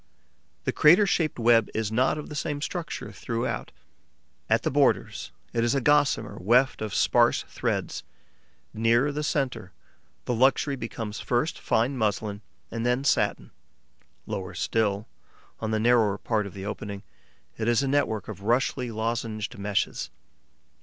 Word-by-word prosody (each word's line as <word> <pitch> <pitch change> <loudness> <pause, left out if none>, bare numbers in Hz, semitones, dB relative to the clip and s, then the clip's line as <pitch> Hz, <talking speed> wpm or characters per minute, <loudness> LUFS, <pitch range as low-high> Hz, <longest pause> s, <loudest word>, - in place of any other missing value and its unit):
The - - 0
crater 180 +7 +6
shaped 165 -5 0
web 115 -2 +4
is 110 -1 -1
not 130 +6 +2
of 150 - -6
the - - -8
same 150 -1 -2
structure 165 +2 -4
throughout. 120 0 -3 0.8
At - - +3
the - - 0
borders, - - +1 0.2
it 115 - +1
is 120 +3 +2
a - - +3
gossamer 145 +1 +2
weft 125 +7 +3
of 110 -2 -3
sparse - - +3
threads; - - -2 0.7
nearer 115 +6 +3
the 150 +1 -3
centre, 125 - -2 0.5
the 125 - 0
texture 135 +3 +3
becomes 115 -3 -5
first 125 +6 -1
fine 125 +4 0
muslin 105 -1 -1 0.3
and 115 0 -3
then 125 +2 +1
satin; - - +1 0.7
lower - - -5
still, 105 -2 0 0.5
on 110 - -3
the 110 0 0
narrower 110 -3 +3
part 105 -2 -1
of 100 - -11
the 95 0 -6
opening, 100 -1 -5 0.6
it 110 - -1
is 120 +3 +3
a - - 0
network 120 -8 0
of 100 -3 -7
roughly 120 +3 0
lozenged 110 -1 -3
meshes. 100 0 -1
115 Hz, 145 wpm, -26 LUFS, 110-135 Hz, 0.8 s, crater